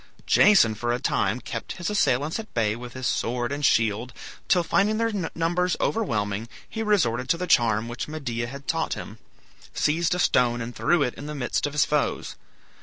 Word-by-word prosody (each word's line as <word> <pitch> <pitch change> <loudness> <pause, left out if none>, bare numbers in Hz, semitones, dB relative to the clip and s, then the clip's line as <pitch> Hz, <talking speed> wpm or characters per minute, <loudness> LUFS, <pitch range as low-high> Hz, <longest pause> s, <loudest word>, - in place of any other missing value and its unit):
Jason 190 - +5
for 120 +2 -2
a 120 - 0
time 105 0 0
kept 120 - -6
his 175 -1 -5
assailants 150 - +1
at 220 - -8
bay 110 -2 +1
with 120 0 -9
his 130 -1 -6
sword 120 +1 -1
and 145 +1 -4
shield, 115 0 +2 0.3
till, 180 -2 +3
finding 205 +5 +2
their 230 0 0 0.2
numbers 175 +2 0
overwhelming, 110 - -1 0.2
he 225 - -5
resorted 130 - +1
to 170 - +3
the 180 - -3
charm 115 -8 +3
which 120 +1 -5
Medea 125 -7 -4
had 140 +3 -9
taught 160 -1 0
him, - - -9 0.6
seized 170 +3 +1
a - - -2
stone 120 -8 +2
and 120 0 -6
threw 175 -4 +2
it 125 - -1
in 145 - -9
the 150 - -5
midst 135 +1 -1
of 145 - -7
his 150 - +3
foes. 150 -1 -1
135 Hz, 190 wpm, -25 LUFS, 120-170 Hz, 0.6 s, Jason